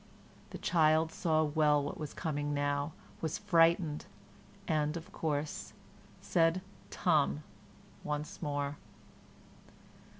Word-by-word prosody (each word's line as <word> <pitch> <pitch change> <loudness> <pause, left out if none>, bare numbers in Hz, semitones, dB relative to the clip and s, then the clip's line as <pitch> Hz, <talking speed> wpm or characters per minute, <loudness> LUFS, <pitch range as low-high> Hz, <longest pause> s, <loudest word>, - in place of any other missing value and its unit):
The - - -7
child 160 -1 +3
saw 155 -2 +2
well 150 -1 +3
what 145 - -5
was 150 -2 -5
coming 145 -3 -2
now, 145 +1 0 0.3
was 160 -2 -1
frightened, 165 -2 +3 0.6
and, 155 0 +1
of 165 - -9
course, 150 -1 -3 0.5
said 165 +1 +2 0.3
"tum" 155 -4 +2 0.6
once 150 0 -4
more. 145 -2 -2
155 Hz, 100 wpm, -33 LUFS, 145-160 Hz, 0.6 s, child